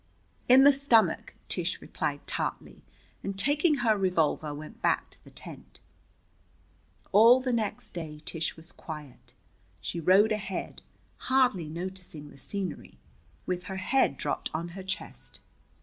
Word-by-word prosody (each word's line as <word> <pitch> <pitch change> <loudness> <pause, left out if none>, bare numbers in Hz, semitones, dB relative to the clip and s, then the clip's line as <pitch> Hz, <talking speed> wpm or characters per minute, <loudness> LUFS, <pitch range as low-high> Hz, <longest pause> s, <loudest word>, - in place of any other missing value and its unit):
"In 260 +2 +9
the 285 +1 +8
stomach," 265 -5 +3
Tish - - -1
replied - - -4
tartly, - - -4 0.4
and 195 0 -4
taking 295 - +3
her 220 -1 +5
revolver 170 -6 +1
went 155 +11 -9
back - - +1
to - - -18
the - - -15
tent. - - -11 1.3
All 230 +5 +8
the 255 -1 -1
next 220 -3 -2
day 155 -3 -6
Tish 165 -1 -3
was 165 +1 -8
quiet. 145 -6 -10 0.5
She 170 - -4
rode 195 +6 +5
ahead, 200 -3 -3 0.5
hardly 250 -12 +3
noticing 175 -3 -7
the - - -15
scenery, 190 +5 -5 0.5
with 180 -1 -3
her 190 0 -5
head 190 - +2
dropped - - -2
on 170 +2 -3
her 190 +3 -8
chest. 190 +1 -5
190 Hz, 135 wpm, -29 LUFS, 160-230 Hz, 1.3 s, In